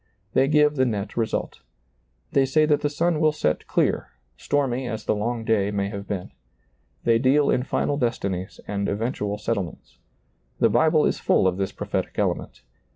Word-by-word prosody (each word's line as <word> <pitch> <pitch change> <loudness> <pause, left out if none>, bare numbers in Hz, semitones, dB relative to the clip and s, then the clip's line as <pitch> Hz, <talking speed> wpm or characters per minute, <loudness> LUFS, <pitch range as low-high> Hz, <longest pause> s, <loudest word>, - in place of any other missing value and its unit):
They 135 - +4
give 150 0 +3
the 130 - +4
net 105 -3 -3
result. 115 -2 -2 0.7
They 135 - +4
say 155 +4 +3
that 150 -1 +2
the 145 - +1
sun 165 +2 0
will 155 0 +4
set 80 - -1
clear, - - +1 0.3
stormy 130 - -1
as 110 -2 -5
the - - +2
long 115 +2 -2
day 105 -3 +2
may 100 -1 -1
have 100 -1 -7
been. 95 -3 -4 0.7
They 115 -1 +3
deal 140 +3 +3
in 125 - +2
final 140 +2 -1
destinies 100 -7 -2
and 100 -1 -2
eventual 105 -1 -2
settlements. 105 -6 -4 0.6
The - - +4
Bible - - +4
is - - 0
full - - +2
of 95 -1 +2
this 95 -1 -1
prophetic - - -4
element. - - -2
115 Hz, 170 wpm, -24 LUFS, 100-140 Hz, 0.7 s, They